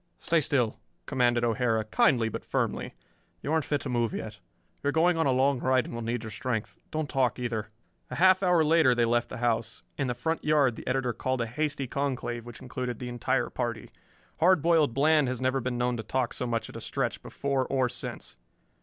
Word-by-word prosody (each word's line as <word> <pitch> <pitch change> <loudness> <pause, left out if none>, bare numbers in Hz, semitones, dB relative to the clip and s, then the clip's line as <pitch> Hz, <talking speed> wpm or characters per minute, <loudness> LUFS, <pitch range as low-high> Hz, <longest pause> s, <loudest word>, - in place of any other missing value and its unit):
"Stay 165 -1 +1
still," 120 -6 0 0.3
commanded 120 -3 +2
O'Hara, 115 -2 +1
kindly 115 +2 +3
but 110 - -5
firmly. - - -2 0.5
"You 150 - -1
aren't 160 -2 +1
fit 145 -1 -1
to - - -5
move 120 -2 0
yet. 105 -1 -6 0.4
You - - -3
are - - +3
going 170 +3 +3
on 160 -2 +1
a - - +3
long 130 +1 +2
ride 130 -1 +2
and - - -8
will 115 - -4
need 115 0 -2
your 110 - -6
strength. 115 -1 -3
Don't 155 -1 -2
talk, 130 -4 +1
either." 115 -3 -3 0.4
A - - -5
half 185 +3 +5
hour 180 -4 +4
later 155 -5 +4
they 120 -1 +3
left 120 0 +1
the - - -6
house. 115 -2 -1 0.2
In 135 - +1
the 125 - -1
front 160 +7 -2
yard 145 -5 +3
the - - -10
editor 125 -2 0
called 130 +2 -1
a - - 0
hasty 140 +3 -2
conclave 125 -3 -3
which 120 - -10
included 125 -2 -4
the 125 +1 -6
entire 125 +2 -1
party. 120 -2 -4 0.5
Hard 175 -2 +4
Boiled 160 -7 +3
Bland 150 0 +4
has 125 -1 -2
never 130 +1 +1
been 125 0 -2
known 125 0 0
to 110 - -4
talk 125 +2 -1
so 125 - -2
much 115 -1 -1
at - - -12
a - - -7
stretch, - - -2
before 135 -2 -2
or 130 -2 +1
since. 125 -1 -6
125 Hz, 215 wpm, -28 LUFS, 120-140 Hz, 0.5 s, half